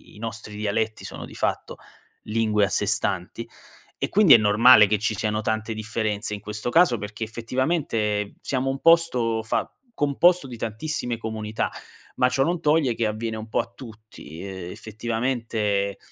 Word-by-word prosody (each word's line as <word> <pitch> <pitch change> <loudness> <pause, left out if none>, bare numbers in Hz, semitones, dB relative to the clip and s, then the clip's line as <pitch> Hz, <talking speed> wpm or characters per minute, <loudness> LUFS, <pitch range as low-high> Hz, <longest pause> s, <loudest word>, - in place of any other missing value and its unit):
i - - -14
nostri 110 -1 -5
dialetti 110 +1 -2
sono - - -7
di - - -13
fatto - - -2 0.5
lingue 105 -1 +1
a - - -4
sé 105 - 0
stanti; 105 +2 -2 0.5
e - - -2
quindi 200 -7 +6
è - - +10
normale 105 +1 +7
che 105 0 +1
ci 110 0 -1
siano 105 +1 -1
tante 110 +1 -2
differenze 110 -1 -3
in 105 - -4
questo 105 +2 -4
caso, 165 -4 +4
perché 105 +2 -6
effettivamente 115 -3 -1
siamo 135 0 -1
un 135 0 -3
posto 130 -10 +3
fa 110 - -1 0.2
composto 170 +1 +3
di 125 -3 -8
tantissime 120 +3 -3
comunità, 110 -1 -3 0.5
ma 125 - +4
ciò 135 +1 +1
non 170 +3 0
toglie 150 -4 +2
che 115 - 0
avviene 110 +1 -3
un 110 +1 -7
po' - - 0
a 115 - -13
tutti, 110 - -12
ehm, 95 -2 -7
effettivamente 110 -3 -2
110 Hz, 165 wpm, -24 LUFS, 105-125 Hz, 0.5 s, è